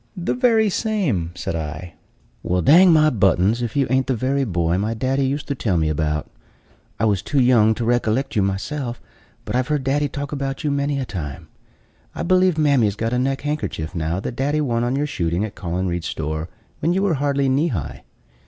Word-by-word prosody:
"The 175 Hz, -, -1 dB
very 230 Hz, -4 st, +3 dB
same," 185 Hz, -, 0 dB
said 85 Hz, -, -4 dB
I. 80 Hz, +2 st, -5 dB, 0.5 s
"Well, 90 Hz, 0 st, 0 dB
dang 175 Hz, +6 st, +7 dB
my 155 Hz, -1 st, +5 dB
buttons, 100 Hz, +1 st, +2 dB
if 120 Hz, -2 st, -3 dB
you 140 Hz, -1 st, +3 dB
ain't 130 Hz, 0 st, +2 dB
the 130 Hz, -, +1 dB
very 135 Hz, +4 st, 0 dB
boy 85 Hz, -3 st, 0 dB
my 110 Hz, +3 st, -1 dB
daddy 130 Hz, +3 st, 0 dB
used 140 Hz, +2 st, -3 dB
to -, -, +1 dB
tell 105 Hz, -9 st, -1 dB
me 80 Hz, -1 st, +1 dB
about. 75 Hz, 0 st, -1 dB, 0.7 s
I 110 Hz, -, +2 dB
was 100 Hz, -4 st, +1 dB
too 145 Hz, -, 0 dB
young 115 Hz, -4 st, +4 dB
to 120 Hz, -, -3 dB
recollect 120 Hz, +3 st, 0 dB
you 105 Hz, -, +3 dB
myself; 120 Hz, +6 st, -3 dB, 0.5 s
but -, -, -3 dB
I've 130 Hz, 0 st, +1 dB
heard 150 Hz, -3 st, 0 dB
daddy 145 Hz, +2 st, +1 dB
talk 145 Hz, 0 st, -5 dB
about 135 Hz, 0 st, -3 dB
you 150 Hz, -, 0 dB
many 140 Hz, 0 st, 0 dB
a 130 Hz, -, -2 dB
time. 75 Hz, -, -6 dB, 0.7 s
I -, -, -3 dB
believe 185 Hz, -1 st, +3 dB
mammy's 135 Hz, -9 st, +3 dB
got 115 Hz, +2 st, -2 dB
a 125 Hz, -, +1 dB
neck 135 Hz, +1 st, -1 dB
handkerchief 145 Hz, -, -3 dB
now 85 Hz, +1 st, -2 dB
that 115 Hz, -, -5 dB
daddy 145 Hz, +4 st, 0 dB
won 120 Hz, -5 st, 0 dB
on 120 Hz, +2 st, 0 dB
your 145 Hz, +2 st, 0 dB
shooting 90 Hz, -, -1 dB
at 105 Hz, -, -8 dB
Collen 90 Hz, +1 st, -3 dB
Reid's 85 Hz, -1 st, -2 dB
store, 80 Hz, +1 st, -4 dB, 0.3 s
when 165 Hz, +3 st, +1 dB
you 190 Hz, +2 st, +1 dB
were 195 Hz, -4 st, +2 dB
hardly 140 Hz, -1 st, 0 dB
knee 140 Hz, +5 st, +2 dB
high. 95 Hz, -, -4 dB
125 Hz, 210 wpm, -21 LUFS, 95-145 Hz, 0.7 s, dang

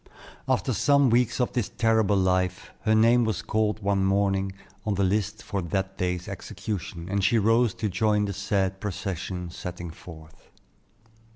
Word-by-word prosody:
After -, -, +1 dB
some 140 Hz, -3 st, +4 dB
weeks 120 Hz, 0 st, +2 dB
of 125 Hz, -, 0 dB
this 120 Hz, -5 st, -1 dB
terrible 110 Hz, -3 st, +2 dB
life, 95 Hz, 0 st, 0 dB
her 110 Hz, 0 st, +4 dB
name 115 Hz, +2 st, +5 dB
was 110 Hz, -1 st, -1 dB
called 110 Hz, -1 st, 0 dB
one 100 Hz, -1 st, +1 dB
morning, 95 Hz, 0 st, +1 dB, 0.3 s
on 105 Hz, -2 st, -1 dB
the 100 Hz, -, +1 dB
list 105 Hz, +2 st, 0 dB
for 100 Hz, -, -3 dB
that 95 Hz, +3 st, -3 dB
day's 90 Hz, -1 st, -1 dB
execution, 85 Hz, -5 st, -5 dB
and 100 Hz, +1 st, -1 dB
she 110 Hz, +4 st, +4 dB
rose 115 Hz, +1 st, +3 dB
to 110 Hz, -, -2 dB
join 105 Hz, +2 st, +1 dB
the 100 Hz, -, -3 dB
sad 95 Hz, -1 st, -1 dB
procession 90 Hz, -2 st, -4 dB
setting 90 Hz, -1 st, -6 dB
forth. 80 Hz, -2 st, -14 dB
100 Hz, 160 wpm, -26 LUFS, 95-110 Hz, 0.3 s, name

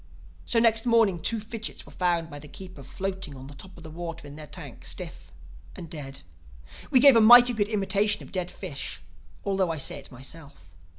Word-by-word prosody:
"So -, -, 0 dB
next 230 Hz, 0 st, +3 dB
morning 225 Hz, -6 st, +4 dB
two 225 Hz, +7 st, +1 dB
fidgits 220 Hz, +1 st, -6 dB
were -, -, -14 dB
found 170 Hz, -2 st, 0 dB
by 145 Hz, -, -8 dB
the 150 Hz, -, -11 dB
keeper 185 Hz, 0 st, -10 dB
floating 190 Hz, 0 st, -5 dB
on 130 Hz, 0 st, -10 dB
the 140 Hz, -, -10 dB
top 185 Hz, +6 st, -13 dB
of 170 Hz, -, -13 dB
the 160 Hz, -, -9 dB
water 165 Hz, -1 st, -7 dB
in 145 Hz, 0 st, -10 dB
their 155 Hz, 0 st, -9 dB
tank, -, -, -9 dB
stiff -, -, -5 dB, 0.4 s
and 170 Hz, -2 st, -9 dB
dead. 135 Hz, -4 st, -7 dB, 0.7 s
We 270 Hz, -4 st, +5 dB
gave 275 Hz, -1 st, +8 dB
a 230 Hz, -, +6 dB
mighty 245 Hz, +2 st, +9 dB
good 205 Hz, -2 st, 0 dB
imitation 205 Hz, 0 st, +1 dB
of -, -, -13 dB
dead 180 Hz, -2 st, -2 dB
fish—although 135 Hz, -, -5 dB
I 165 Hz, -, -2 dB
say 140 Hz, 0 st, -3 dB
it 135 Hz, -, -14 dB
myself. 130 Hz, -, -11 dB
180 Hz, 195 wpm, -27 LUFS, 145-210 Hz, 0.7 s, mighty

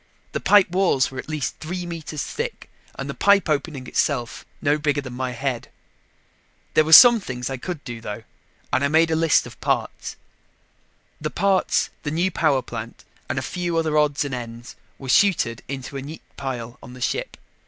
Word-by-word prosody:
The -, -, -2 dB
pipe 205 Hz, -4 st, +5 dB
walls 180 Hz, -9 st, +2 dB
were 130 Hz, -, -6 dB
at -, -, -7 dB
least 155 Hz, -4 st, -3 dB
three 175 Hz, +3 st, -4 dB
meters 160 Hz, -3 st, -5 dB
thick 470 Hz, +1 st, -5 dB, 0.2 s
and -, -, -5 dB
the -, -, -4 dB
pipe 200 Hz, -1 st, +4 dB
opening 145 Hz, -3 st, -2 dB
itself 120 Hz, -1 st, -1 dB
no 145 Hz, +1 st, +1 dB
bigger 145 Hz, -1 st, +1 dB
than 130 Hz, -3 st, -8 dB
my 130 Hz, +1 st, -2 dB
head. 125 Hz, -1 st, -3 dB, 1.0 s
There 155 Hz, -, +5 dB
were 155 Hz, -, -3 dB
some 240 Hz, +7 st, +10 dB
things 125 Hz, -8 st, -5 dB
I 135 Hz, -, -3 dB
could 165 Hz, +3 st, -6 dB
do, 120 Hz, -3 st, -7 dB
though, 110 Hz, 0 st, -6 dB, 0.5 s
and 135 Hz, -, +2 dB
I -, -, +4 dB
made 160 Hz, +2 st, +3 dB
a -, -, +2 dB
list 160 Hz, -1 st, +3 dB
of -, -, -12 dB
parts. -, -, -2 dB, 1.1 s
The 155 Hz, -, -2 dB
parts, 190 Hz, +3 st, +1 dB
the 145 Hz, -, -3 dB
new 170 Hz, +5 st, 0 dB
power 140 Hz, -7 st, +2 dB
plant 115 Hz, -1 st, -7 dB, 0.3 s
and -, -, -2 dB
a -, -, -1 dB
few 175 Hz, -2 st, -2 dB
other 160 Hz, -2 st, 0 dB
odds 150 Hz, -1 st, +2 dB
and 140 Hz, -, -4 dB
ends 120 Hz, -1 st, -7 dB, 0.2 s
were 135 Hz, -, -9 dB
chuted 130 Hz, -, +3 dB
into 135 Hz, 0 st, -6 dB
a -, -, -4 dB
neat 150 Hz, +4 st, -9 dB
pile 120 Hz, -3 st, -5 dB
on 125 Hz, -, -11 dB
the 125 Hz, -, -11 dB
ship. -, -, -2 dB
145 Hz, 190 wpm, -23 LUFS, 130-165 Hz, 1.1 s, some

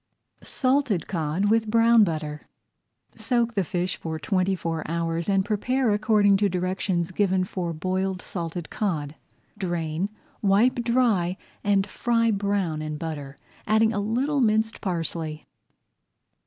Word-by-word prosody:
SALTED 255 Hz, -, +1 dB
COD 165 Hz, +1 st, -1 dB
WITH 225 Hz, 0 st, +2 dB
BROWN 230 Hz, 0 st, +6 dB
BUTTER 155 Hz, -4 st, -2 dB, 0.7 s
Soak 235 Hz, -2 st, 0 dB
the 200 Hz, -3 st, +1 dB
fish 180 Hz, +1 st, -2 dB
for 160 Hz, -1 st, -4 dB
twenty 190 Hz, +3 st, 0 dB
four 165 Hz, -3 st, -3 dB
hours 165 Hz, +1 st, -1 dB
and 195 Hz, -1 st, +2 dB
prepare 235 Hz, +4 st, +1 dB
according 210 Hz, -1 st, +4 dB
to 200 Hz, 0 st, +2 dB
directions 185 Hz, -1 st, -1 dB
given 190 Hz, -1 st, +1 dB
for 180 Hz, -2 st, -3 dB
Boiled 185 Hz, +3 st, -2 dB
Salted 170 Hz, -2 st, -5 dB
Cod. 155 Hz, -9 st, -2 dB, 0.5 s
Drain, 175 Hz, -1 st, -2 dB, 0.3 s
wipe 220 Hz, +5 st, +3 dB
dry, 225 Hz, -7 st, +2 dB, 0.3 s
and 200 Hz, -1 st, +3 dB
fry 230 Hz, +2 st, +1 dB
brown 200 Hz, -6 st, -1 dB
in 155 Hz, -1 st, -4 dB
butter, 150 Hz, -3 st, -6 dB, 0.3 s
adding 220 Hz, +1 st, +3 dB
a 205 Hz, -, -1 dB
little 260 Hz, +8 st, 0 dB
minced 220 Hz, -1 st, +1 dB
parsley. 165 Hz, -4 st, -3 dB
190 Hz, 130 wpm, -25 LUFS, 170-220 Hz, 0.7 s, BROWN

